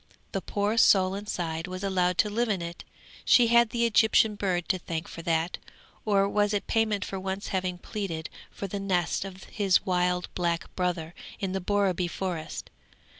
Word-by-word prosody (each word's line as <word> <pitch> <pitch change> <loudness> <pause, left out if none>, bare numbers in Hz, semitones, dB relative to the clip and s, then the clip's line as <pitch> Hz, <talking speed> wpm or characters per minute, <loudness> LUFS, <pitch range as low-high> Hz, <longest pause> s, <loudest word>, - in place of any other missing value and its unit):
The 195 - -2
poor 205 +3 -1
soul 190 -3 +5
inside 175 -5 -3
was 185 +1 -6
allowed 180 -2 +1
to 210 - +3
live 235 +2 0
in 200 -3 +1
it; 170 0 -7 0.4
she 240 -2 +5
had 235 -1 +5
the 235 +1 +1
Egyptian 220 -1 +4
bird 185 -4 -1
to 185 - +1
thank 165 -1 -4
for 165 - -8
that; 165 +1 0 0.5
or 200 -2 +3
was 205 +1 +1
it 200 - -1
payment 215 -4 +1
for 195 - -5
once 190 +1 -4
having 185 -1 -1
pleaded 175 -4 -4 0.2
for - - -6
the 200 +1 -4
nest 185 -3 0
of 190 -1 -9
his 200 -2 +1
wild 180 -1 +1
black 170 -2 -2
brother 175 -3 -1 0.3
in 195 -2 -2
the 190 0 -2
Borreby 190 -2 +1
Forest? 175 -3 -5
190 Hz, 175 wpm, -28 LUFS, 180-205 Hz, 0.5 s, soul